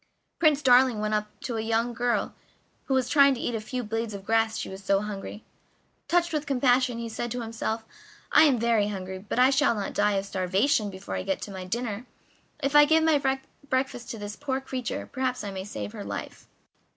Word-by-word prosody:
Prince 300 -3 +3
Darling 250 -3 +5
went 215 0 -1
up 210 0 0
to 235 -3 -3
a - - -1
young 230 +2 0
girl 240 0 0 0.5
who 270 - 0
was 260 -2 +1
trying 280 0 +5
to - - -7
eat 240 - -2
a 225 - -2
few 250 +3 -4
blades 225 0 -3
of 195 -1 -9
grass, 225 0 +2
she - - -4
was 190 +1 -9
so 195 0 +2
hungry. 210 0 -6 0.6
Touched 345 -1 +2
with 300 -1 -2
compassion, 255 -2 +2
he 235 0 -4
said 235 +1 -4
to 245 +1 -3
himself: 225 0 -3 0.5
"I - - +7
am 275 -5 +4
very 225 -3 +2
hungry, 190 -2 -5
but 205 +4 -5
I 255 +2 +6
shall 275 -3 +3
not 205 -2 -3
die 210 0 +2
of 195 0 -1
starvation 200 +5 +1
before 190 0 -8
I - - -2
get 190 +2 -3
my 190 -2 -7
dinner; 230 +3 -3 0.6
if 275 +2 0
I 295 0 +9
give 320 +1 +4
my 315 -3 +3 0.5
breakfast 260 -2 -1
to 230 - -5
this 205 0 -6
poor 270 -1 -2
creature 260 -3 -4
perhaps 255 -3 -2
I 200 - -4
may 190 -1 -5
save 105 - -6
her - - -7
life." 100 0 -7
230 Hz, 210 wpm, -27 LUFS, 205-260 Hz, 0.6 s, I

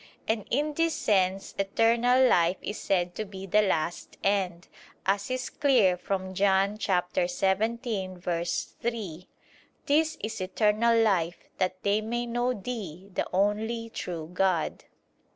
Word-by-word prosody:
And 220 -2 -1
in 295 +4 0
this 330 +1 +1
sense 195 -1 +1
eternal 235 +6 +4
life 175 -3 +3
is 205 - -4
said 175 -2 0
to 215 - -3
be 195 -2 -8
the 210 +3 +4
last 170 -4 -1
end, 185 -3 0 0.4
as 200 +3 0
is 255 0 -3
clear 245 -11 +4
from 190 +1 -3
John 195 +2 +2
17:3: 195 - -1 0.6
"This 315 +2 +2
is 220 -1 -4
eternal 215 +4 +2
life, 180 -6 +1
that 185 0 -1
they 205 +1 +2
may 240 +2 -2
know 240 +1 0
Thee, 200 -5 -6
the - - -1
only 220 +4 0
true 170 -6 -5
God." 185 -4 0
200 Hz, 125 wpm, -28 LUFS, 185-235 Hz, 0.6 s, eternal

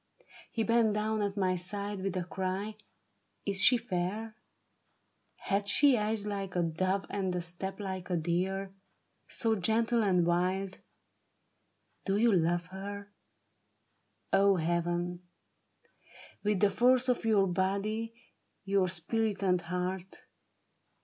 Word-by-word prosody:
He 225 - -1
bent 230 -1 +3
down 215 0 0
at 200 0 -2
my 185 -2 +2
side 200 +2 -3
with 190 -1 -2
a 180 - -1
cry: 190 +4 -3 0.3
" - - -45
Is 195 -1 +2
she 250 - +7
fair? 215 +1 -3 1.0
Hath 200 +1 -1
she 280 +5 +5
eyes 210 -1 -1
like 195 -3 -4
a 175 - +2
dove 185 +4 0
and 190 -3 -1
a 180 - -1
step 175 +4 -5
like 190 -3 -5
a 180 - +1
deer. 190 +4 -1 0.5
So 225 -1 0
gentle 225 +4 +2
and 185 -5 +3
wild? 185 +2 0 1.3
Do 195 0 +1
you 230 +2 +4
love 175 -1 +2
her 200 +1 -7 0.6
— 110 0 -31
O 195 0 +5
Heaven! 175 +1 -1 0.6
— - - -22
With 210 -2 +1
the 205 -1 +4
force 250 +4 +4
of 250 -1 +1
your 215 -3 +4
body, 200 +5 -1 0.5
your 195 -2 +2
spirit, 205 +5 -1
and 180 -2 +2
heart 180 +2 -4
195 Hz, 135 wpm, -31 LUFS, 180-210 Hz, 1.3 s, she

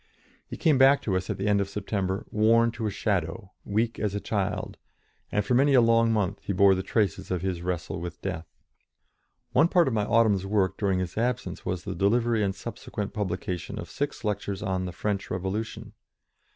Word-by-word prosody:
He - - -7
came 155 -6 +3
back 135 +1 +6
to 95 - 0
us 95 0 -2
at - - -2
the 95 - -3
end 100 -1 +3
of 100 - -2
September, 100 -1 -2
worn 115 +2 +4
to 115 -1 -3
a - - 0
shadow, 100 0 -2
weak 110 +3 -1
as 105 -2 -1
a - - 0
child, 100 -2 -2 0.5
and 105 -1 0
for 115 - 0
many 135 +3 +4
a - - +8
long 115 -1 +4
month 105 -2 0
he 100 - -3
bore 100 +1 +6
the 95 - -1
traces 100 -1 -1
of 90 -1 -2
his 90 -3 -2
wrestle 90 0 -3
with 85 -1 -6
death. 80 0 -4 1.0
One 165 - +5
part 175 -3 +3
of 130 - 0
my 105 -2 +1
autumn's 110 -4 +3
work 95 -1 +1
during 95 -3 0
his 90 +2 -3
absence 120 -6 -2
was 90 -1 -2
the - - -4
delivery 115 +3 +2
and 100 -1 0
subsequent 105 +2 -6
publication 90 -3 -3
of - - -7
six 145 -4 -3
lectures 100 -1 -2
on 95 -2 -1
the 90 - -4
French 105 +2 -3
Revolution. 95 +5 -4
100 Hz, 200 wpm, -27 LUFS, 95-115 Hz, 1.0 s, a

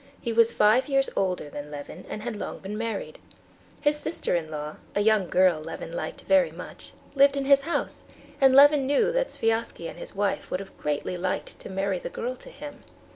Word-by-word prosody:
He 235 - -3
was 230 0 +5
five 225 +6 +3
years 270 -1 +2
older 185 -5 0
than 145 0 -7
Levin, 150 +4 -8
and 215 - -5
had 240 -1 -3
long 205 - -5
been 195 +2 -6
married. 350 - -4 0.6
His 295 0 +2
sister 330 - -2
in 165 -2 -2
law, 150 0 -5 0.2
a 205 - +2
young 210 -3 +3
girl 180 -3 +4
Levin - - -7
liked - - -5
very 285 -1 +4
much, - - -10 0.2
lived 280 0 +5
in 275 - -1
his 275 0 +6
house; 335 +5 -3 0.4
and 265 -1 +6
Levin 285 -1 +7
knew 430 - +3
that - - 0
Sviazhsky 225 -6 -1
and - - -9
his - - -9
wife 200 0 -1
would 180 - -2
have 195 - -10
greatly 150 +4 -2
liked 185 +1 -3
to - - -9
marry 195 -1 -1
the - - -6
girl 250 +2 -4
to - - -12
him. 290 +1 -10
225 Hz, 205 wpm, -26 LUFS, 185-275 Hz, 0.6 s, Levin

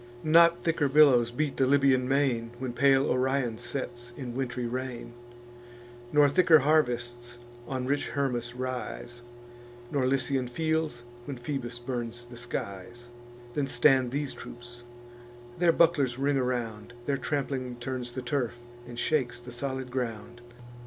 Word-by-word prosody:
Not 170 +2 +5
thicker 160 -4 +1
billows 135 -5 +6
beat 140 +4 -2
the 130 - +3
Libyan 135 -2 +3
main, 130 -4 +1
When 125 -1 -4
pale 135 +1 +4
Orion 130 -3 0
sets 120 -1 -5
in 125 -3 -5
wintry 125 -1 -3
rain; 125 0 -5 1.0
Nor 150 -1 +6
thicker 165 +2 +6
harvests 120 -5 0 0.3
on 130 -2 -3
rich 140 +2 0
Hermus 120 -4 -1
rise, 125 -1 -5 0.7
Or 135 -3 +2
Lycian 135 -1 0
fields, 155 -1 -1 0.2
when 140 -3 -5
Phoebus 120 -1 -4
burns 120 -1 -5
the 120 0 -12
skies, 120 0 -6 0.4
Than 140 0 0
stand 130 0 +4
these 140 +2 -3
troops: 120 0 -10 0.8
their 175 -1 +5
bucklers 150 -8 +3
ring 140 +1 +1
around; 120 -3 -2
Their 140 0 0
trampling 135 -3 -2
turns 120 0 -5
the 130 0 -5
turf, 125 -2 -1 0.3
and 120 -1 -9
shakes 120 -3 0
the 120 0 -10
solid 130 +1 -4
ground. 120 -1 -4
130 Hz, 135 wpm, -28 LUFS, 120-140 Hz, 1.0 s, billows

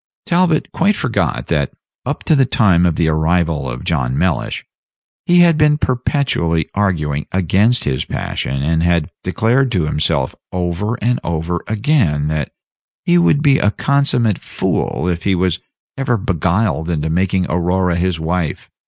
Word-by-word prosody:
Talbot 170 -3 +1
quite 205 +2 +1
forgot 115 - -1
that, 70 -2 -1 0.3
up - - -3
to 160 - +3
the 135 -3 +3
time 90 -9 +3
of 85 - 0
the 80 - +1
arrival 80 -2 +1
of 60 0 -6
John 65 -5 -1
Mellish, 85 -8 -1 0.6
he 175 0 +5
had 170 -2 +4
been 150 -1 +4
perpetually 125 - 0
arguing 75 -8 -1
against 95 +7 +2
his 65 - -1
passion, 70 0 -3
and 80 +2 +1
had 85 -3 +1
declared 125 +3 +1
to 90 -5 +1
himself 75 -3 0 0.2
over 90 +5 -2
and 125 +2 +1
over 85 +1 -2
again 105 - +1
that 75 -1 -2 0.5
he 175 0 +4
would 150 -4 +3
be 140 -3 +4
a 105 - +3
consummmate 125 -4 +1
fool 85 - -2
if 85 -2 -1
he 95 +2 +1
was 90 -2 0 0.4
ever 125 -3 0
beguiled 90 -1 0
into 80 -2 -1
making 95 +2 +1
Aurora 90 +1 0
his 85 -1 -1
wife. 80 0 -3
90 Hz, 155 wpm, -17 LUFS, 80-120 Hz, 0.6 s, he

